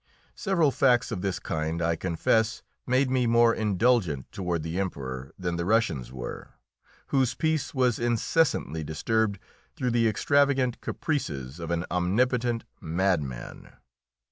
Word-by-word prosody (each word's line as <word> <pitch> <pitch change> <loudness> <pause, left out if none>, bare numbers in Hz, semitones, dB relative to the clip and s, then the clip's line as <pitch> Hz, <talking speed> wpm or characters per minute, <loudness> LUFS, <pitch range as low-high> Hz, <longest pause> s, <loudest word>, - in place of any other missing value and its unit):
Several 170 -8 +2
facts 125 -3 +3
of 100 -5 -3
this 95 -2 -1
kind, 80 +1 -3
I 85 0 +1
confess, 105 +7 0 0.2
made 130 +1 +2
me 125 -2 +2
more 115 0 +5
indulgent 105 - +1
toward 90 -4 -2
the 80 +3 -3
Emperor 70 -8 -4
than 85 -2 -2
the 85 - -1
Russians 95 - +1
were, 60 -2 -7 0.5
whose 130 -3 +2
peace 160 -1 -1
was 125 -4 +2
incessantly 120 - +1
disturbed 100 +7 0 0.4
through 125 -2 -1
the 115 -1 +3
extravagant 135 +2 +2
caprices 75 - -3
of 85 -1 -5
an 85 0 -1
omnipotent 115 +6 +1 0.2
madman. 80 -7 -2
105 Hz, 130 wpm, -27 LUFS, 85-125 Hz, 0.5 s, more